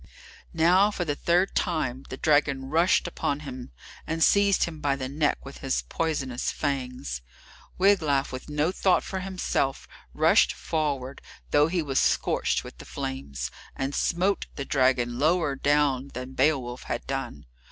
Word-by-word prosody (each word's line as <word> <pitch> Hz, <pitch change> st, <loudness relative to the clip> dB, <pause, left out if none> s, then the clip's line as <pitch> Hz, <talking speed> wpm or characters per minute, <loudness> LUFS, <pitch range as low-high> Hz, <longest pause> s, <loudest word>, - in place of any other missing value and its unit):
Now, 180 Hz, +5 st, +5 dB
for 185 Hz, -4 st, -3 dB
the 145 Hz, -, 0 dB
third 175 Hz, +6 st, +1 dB
time, 140 Hz, -7 st, -1 dB
the 130 Hz, -, -6 dB
dragon 140 Hz, -3 st, +1 dB
rushed 170 Hz, +3 st, +3 dB
upon 145 Hz, -4 st, -2 dB
him, 130 Hz, -4 st, -8 dB, 0.4 s
and 160 Hz, 0 st, 0 dB
seized 200 Hz, +1 st, +4 dB
him 160 Hz, -2 st, -4 dB
by 140 Hz, -1 st, +1 dB
the 130 Hz, -1 st, -4 dB
neck 145 Hz, +2 st, -1 dB
with 135 Hz, -, -9 dB
his 135 Hz, -1 st, -1 dB
poisonous 140 Hz, -6 st, -2 dB
fangs. 125 Hz, -, -3 dB, 0.6 s
Wiglaf, 160 Hz, -8 st, +3 dB
with 130 Hz, +3 st, -7 dB
no 150 Hz, +3 st, +1 dB
thought 190 Hz, -1 st, +2 dB
for 190 Hz, -, -4 dB
himself, 185 Hz, -7 st, -2 dB, 0.2 s
rushed -, -, +4 dB
forward, 140 Hz, -, -3 dB, 0.3 s
though 145 Hz, +1 st, +5 dB
he 170 Hz, 0 st, -1 dB
was 135 Hz, -2 st, 0 dB
scorched -, -, +1 dB
with -, -, -11 dB
the -, -, -10 dB
flames, 65 Hz, -2 st, -5 dB, 0.2 s
and 135 Hz, +1 st, -3 dB
smote 185 Hz, +7 st, 0 dB
the 140 Hz, -, -4 dB
dragon 130 Hz, -3 st, +1 dB
lower 155 Hz, -1 st, +2 dB
down 140 Hz, -1 st, +2 dB
than 125 Hz, +1 st, -6 dB
Beowulf 130 Hz, -3 st, +1 dB
had -, -, -4 dB
done. 135 Hz, -, -4 dB
145 Hz, 150 wpm, -26 LUFS, 130-165 Hz, 0.6 s, Now